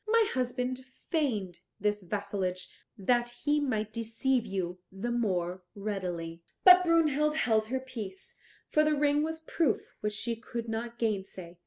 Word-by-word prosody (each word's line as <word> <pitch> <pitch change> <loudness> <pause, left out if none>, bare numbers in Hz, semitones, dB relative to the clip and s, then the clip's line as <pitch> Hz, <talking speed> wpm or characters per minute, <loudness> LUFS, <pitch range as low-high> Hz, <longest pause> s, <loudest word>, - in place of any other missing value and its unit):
My 455 0 +4
husband 255 0 -1 0.3
feigned 215 - 0 0.2
this 210 0 +1
vassalage 185 -1 -2 0.3
that 240 +4 +2 0.2
he 295 0 +4
might 220 -7 -1
deceive 230 +2 0
you 185 -2 -3
the 200 +6 -3
more 185 -6 0
readily." 180 -5 -4 0.2
But 365 -1 +10
Brunhild 305 -3 +3
held 220 -6 +2
her 260 +3 -1
peace, 220 -8 -7 0.3
for 305 - +3
the 305 0 +3
ring 290 0 +3
was 320 +1 -3
a - - -30
proof 315 -9 0
which 210 0 -2
she 230 +3 -2
could 235 0 -6
not 230 +1 -4
gainsay. 190 -6 -3
230 Hz, 150 wpm, -30 LUFS, 195-270 Hz, 0.3 s, But